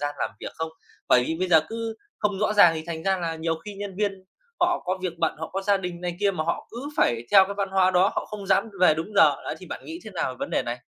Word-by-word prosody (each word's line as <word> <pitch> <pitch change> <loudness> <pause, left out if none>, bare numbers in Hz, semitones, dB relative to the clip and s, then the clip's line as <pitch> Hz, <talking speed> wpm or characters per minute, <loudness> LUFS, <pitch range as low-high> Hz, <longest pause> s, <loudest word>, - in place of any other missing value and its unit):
gian 145 0 -2
làm - - -1
việc - - -6
không? 160 0 -4 0.4
Bởi 125 0 +5
vì 160 - -2
bây 185 0 0
giờ 160 -3 +7
cứ 225 0 -4 0.2
không 205 -2 0
rõ 215 +1 +1
ràng 175 -6 +7
thì 160 - -4
thành 160 -1 -5
ra 190 -1 +2
là 165 -2 -2
nhiều 165 0 -1
khi 210 -1 -7
nhân 200 -2 -6
viên 195 -2 -2 0.4
họ 355 0 +2
có 185 +1 -1
việc 175 -2 -3
bận, 165 -2 +1
họ 160 - -5
có 195 +1 -2
gia 200 0 +3
đình 180 -2 -5
này 175 -1 -3
kia 200 -1 +3
mà 155 -4 -3
họ 170 - -2
cứ 250 +5 -6
phải 120 0 +2
theo 195 -1 +8
cái 200 +1 -5
văn 200 -1 -1
hóa 190 -1 +4
đó, 185 +1 +4
họ - - -2
không 205 -2 -7
dám 195 +4 +2
về 160 -4 +6
đúng 165 +7 -5
giờ, 200 - +6
đấy - - -3
thì - - -11
bạn - - -7
nghĩ 330 +2 -7
thế 215 - -8
nào 130 -8 -3
vấn - - -4
đề - - +1
này? 120 +1 -4
185 Hz, 295 wpm, -25 LUFS, 165-205 Hz, 0.4 s, theo